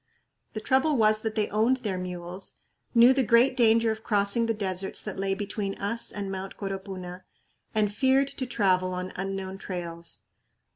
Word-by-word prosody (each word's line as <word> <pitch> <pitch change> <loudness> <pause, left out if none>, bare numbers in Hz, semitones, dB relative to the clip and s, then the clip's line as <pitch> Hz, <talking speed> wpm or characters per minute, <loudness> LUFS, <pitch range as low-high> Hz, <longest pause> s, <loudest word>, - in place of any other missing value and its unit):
The 215 - -3
trouble 265 +6 +2
was 215 -1 +4
that 220 0 -4
they 215 -2 +1
owned 225 +5 +2
their 205 -7 -3
mules, 180 +1 -6 0.4
knew 240 +2 +8
the 265 - +2
great 235 +2 +4
danger 230 -2 +4
of 220 0 -6
crossing 205 +3 +2
the 225 - +1
deserts 190 -2 -2
that 210 -3 -6
lay 195 0 0
between 200 0 -3
us 220 +4 0
and 200 -2 -4
Mt. 190 0 -6
Coropuna, 190 -2 -6 0.5
and 210 -1 +1
feared 270 +3 +3
to 260 -2 -5
travel 185 -5 +1
on 185 0 -4
unknown 195 0 -4
trails. 170 -3 -6
205 Hz, 165 wpm, -27 LUFS, 190-230 Hz, 0.5 s, knew